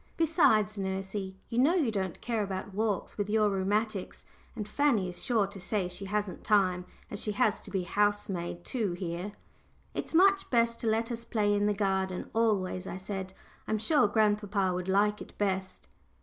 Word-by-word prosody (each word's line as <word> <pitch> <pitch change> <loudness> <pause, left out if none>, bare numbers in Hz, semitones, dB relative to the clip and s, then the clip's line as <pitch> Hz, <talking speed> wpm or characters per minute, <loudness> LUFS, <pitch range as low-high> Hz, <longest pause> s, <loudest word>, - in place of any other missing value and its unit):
Besides, 220 - +3
nursey, 190 0 -3
you 235 - -1
know 300 +8 +5
you 295 -11 +2
don't 190 -4 -2
care 230 -3 -1
about 195 0 -4
walks 210 -1 -1
with 205 0 -1
your 210 -1 +3
rheumatics, 200 +1 -1 0.3
and 210 -3 -4
Fanny 235 -6 +2
is 175 - -4
sure 225 -5 +2
to 200 0 -8
say 190 0 -1
she 180 +2 -6
hasn't 205 -1 -2
time, 185 -4 +2 0.3
as 205 - -3
she 210 - -1
has 210 +1 +2
to - - -10
be 190 -2 -1
housemaid 190 -3 -1
too 215 -8 -1
here." 175 +2 -4 0.6
"It's - - -4
much 390 +2 +5
best 235 -1 +2
to 230 - -3
let 225 +2 +1
us 235 0 -3
play 210 -3 +1
in 205 0 +2
the 210 - +1
garden 190 -2 -1
always," 195 -5 +1
I - - -4
said. 190 0 -5 0.3
"I'm 220 - +1
sure 220 +2 +4
grandpapa 205 -2 +1
would 180 0 -3
like 210 +2 +2
it - - -11
best." 190 -2 -2
205 Hz, 180 wpm, -30 LUFS, 190-220 Hz, 0.6 s, know